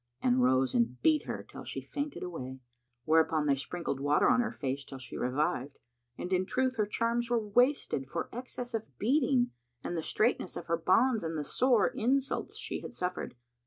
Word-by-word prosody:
and 125 0 +3
rose 130 0 +3
and 120 +1 +1
beat 310 -1 +4
her - - -4
till - - -10
she - - -4
fainted 285 0 -5
away;[FN#160] 130 -7 -6 0.4
whereupon 160 -1 +3
they 140 - +4
sprinkled 140 0 -4
water 145 +2 +3
on 250 0 +4
her 240 - -1
face 135 0 -3
till 135 - -9
she 130 -2 -9
revived; 135 +1 -1 0.4
and 180 - -3
in 185 0 +3
truth 260 +5 0
her 210 -2 +1
charms 235 +2 0
were 240 - +3
wasted 245 - +2
for - - -3
excess 245 0 -5
of 225 -1 -5
beating 250 +1 +2 0.3
and 175 - -3
the 165 - -1
straitness 215 +2 0
of 170 - -6
her 170 - +1
bonds 210 +7 +3
and 160 -1 -2
the 150 - -2
sore 245 - +3
insults 270 +4 0
she - - -4
had - - -8
suffered. 180 -5 -3
180 Hz, 190 wpm, -31 LUFS, -, 0.4 s, beat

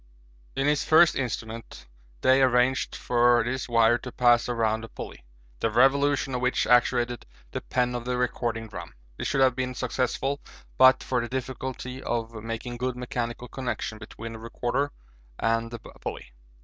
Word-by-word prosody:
In 135 - 0
his 150 0 +2
first 160 +1 +6
instrument 115 -3 -5 0.4
Day 130 +1 +5
arranged 130 0 +2
for 120 -1 +3
this 130 +2 -3
wire 115 0 +4
to 125 - -8
pass 120 -1 +3
around 110 -2 0
a - - -6
pulley, - - -9 0.4
the 115 - +1
revolution 135 +3 +3
of 125 - -1
which 125 0 +1
actuated 120 0 +2 0.2
the - - -4
pen 125 -1 0
of 120 -1 -4
the 125 0 -1
recording 120 -2 -1
drum. 110 - -9 0.2
This - - -3
should 135 - +1
have 130 -2 +4
been 130 0 -2
successful 130 +3 -1 0.4
but 130 0 +7
for 125 -2 0
the 120 - -5
difficulty 130 0 -5
of 115 -1 -2
making 115 +2 -5
good 125 +1 -2
mechanical 120 -1 -4
connection 120 -3 -4
between 115 +1 -8
the 115 - -8
recorder 120 +5 -2 0.5
and 115 +1 0
the 120 - -6
pulley. - - -8
125 Hz, 160 wpm, -26 LUFS, 115-130 Hz, 0.5 s, but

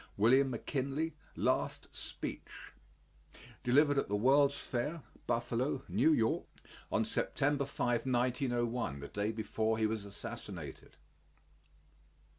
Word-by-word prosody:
WILLIAM 130 +6 +5
McKINLEY 140 +6 -2 0.2
LAST - - 0
SPEECH - - -7 0.9
Delivered 145 +3 +4
at - - -1
the 105 - +1
World's 140 +6 +4
Fair, 145 +6 -3 0.2
Buffalo, 120 +3 0
N.Y., 115 -8 +3 0.5
on - - +2
September 140 0 0
5, 120 -2 -1
1901, 120 - 0
the 70 - -6
day 105 +1 -1
before 110 0 -1
he 110 - +2
was 110 -1 -1
assassinated. 100 -1 -8
120 Hz, 100 wpm, -34 LUFS, 110-140 Hz, 0.9 s, WILLIAM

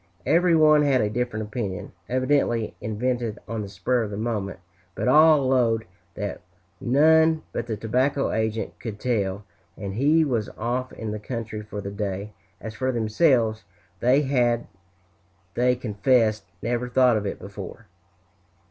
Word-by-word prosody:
Every 175 0 +4
one 155 -1 +6
had 140 -3 +3
a 105 - 0
different 115 -2 -2
opinion, 105 -3 -5 0.2
evidently 130 -3 +1
invented 115 +1 -2
on 115 -2 -3
the 100 - -6
spur 110 +6 0
of 110 - -3
the 100 - -5
moment, 105 -3 -3 0.4
but - - -2
all 150 +1 +6
"'lowed" 115 -4 +2 0.3
that 100 -1 -4 0.4
none 160 +4 +4
but 120 - -3
the 110 -2 -3
tobacco 130 +6 0
agent 110 0 -2
could 105 -3 -6
tell, 105 -5 -1 0.3
and 100 -1 -5
he 150 +8 +3
was 115 -7 -1
off 125 +3 -2
in 110 -2 -5
the 105 - -4
country 110 -1 -5
for 105 -1 -7
the 100 0 -6
day; 100 0 -4 0.3
as 110 0 -7
for 130 +4 -1
themselves, 115 -1 +2 0.4
they 130 +4 +3
had, 120 -4 +1 0.9
they 125 +1 +2
confessed, 110 -1 +1 0.2
never 120 +1 -1
thought 125 -1 +4
of 105 -1 -1
it - - -4
before. 100 +2 -9
115 Hz, 150 wpm, -24 LUFS, 105-130 Hz, 0.9 s, one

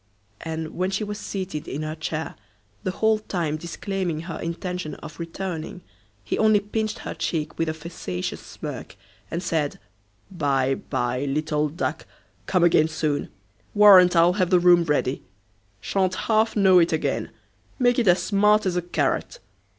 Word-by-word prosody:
And, 160 -1 -4
when 185 +1 -1
she 195 +2 -2
was 210 0 -5
seated 185 -7 -5
in 150 +3 -4
her 155 0 -3
chair, 155 0 -4 0.5
the - - -2
whole 220 +3 +2
time 170 -7 -2
disclaiming 170 0 -3
her 165 -1 -6
intention 175 -1 -4
of 155 +2 -11
returning, 170 0 -5 0.4
he - - -2
only 215 -1 +5
pinched 215 +1 -3
her - - -4
cheek 155 -2 -3
with 165 -1 +1
a - - -1
facetious 150 - -5
smirk, - - -8 0.3
and 170 +2 -3
said, 160 -4 -1 0.5
"By, 135 -6 +1
by, 125 0 -2
little 150 +1 0
duck; 165 +5 -4 0.4
come 185 -2 +2
again 160 -2 +5
soon. 155 -2 -2 0.5
Warrant 190 -4 +8
I'll 170 +1 +5
have 185 -2 +1
the 180 -2 +5
room 175 -1 +5
ready. 145 -3 0 0.6
Sha'n't 185 -2 0
half 220 0 +2
know 190 -3 +6
it 170 - +3
again; 160 - -1 0.5
make 245 -1 +3
it 230 - +1
as 180 0 +4
smart 210 +1 +3
as 185 -2 0
a 180 - +1
carrot." 175 - -1
175 Hz, 160 wpm, -24 LUFS, 155-195 Hz, 0.6 s, Warrant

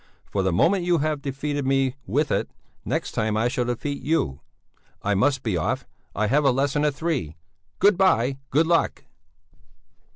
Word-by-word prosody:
For 100 - -2
the 95 -1 +1
moment 175 - +3
you 175 -1 +2
have 155 -1 -1
defeated 145 +1 -3
me 135 -1 +1
with 145 +9 0
it, - - 0 0.3
next - - -2
time 110 0 0
I 115 +2 +2
shall 125 0 -1
defeat 140 +4 -3
you. 135 - 0 0.6
I 105 - +1
must 135 +7 +1
be 110 -6 -1
off, 80 - -1 0.3
I 110 - +1
have 140 +7 +2
a 140 - +5
lesson 140 +3 +1
at 145 -2 +1
three! 145 - -2 0.4
Good 200 -1 +4
bye, 135 -8 +3
good 155 +4 +3
luck!" 165 0 +1
135 Hz, 170 wpm, -24 LUFS, 115-155 Hz, 0.6 s, a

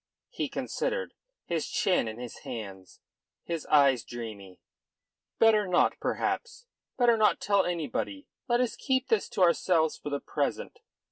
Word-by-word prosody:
He - - -3
considered, - - -3 0.3
his 165 -2 -2
chin 180 - +1
in 110 0 -6
his 120 -1 -8
hand, 95 -5 -8 0.5
his 165 -3 -4
eyes 140 -5 +4
dreamy. 105 -6 -8 0.8
"Better 215 -3 +4
not, 180 - +2
perhaps. 470 0 -2 0.3
Better 240 -2 +4
not 215 -1 +3
tell 200 0 +2
anybody. 180 - -3 0.2
Let 240 0 +2
us 250 - -1
keep 260 -1 0
this 225 -4 +1
to 185 - +1
ourselves 170 -2 +2
for - - -6
the 145 0 -2
present. - - -3
175 Hz, 140 wpm, -29 LUFS, -, 0.8 s, eyes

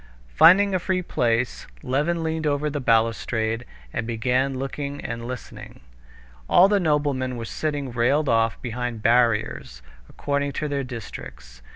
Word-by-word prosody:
Finding 195 - +6
a 185 - +2
free 185 +1 -1
place, 120 -4 -1 0.2
Levin 155 +6 0
leaned 160 -1 -1
over 145 +1 0
the 145 - -3
balustrade 115 0 +1 0.3
and 115 - -3
began 125 +3 0
looking 140 +2 -4
and 115 0 -5
listening. 125 -1 -9 0.7
All 185 - +7
the 205 0 +2
noblemen 145 -6 0
were 115 - -5
sitting 145 +1 -3
railed 130 +6 +1
off 115 -2 +2
behind 120 -2 -4
barriers 115 - +1 0.3
according 140 0 -2
to 155 - -2
their 140 -1 -2
districts. 65 - -9
130 Hz, 140 wpm, -24 LUFS, 115-150 Hz, 0.7 s, All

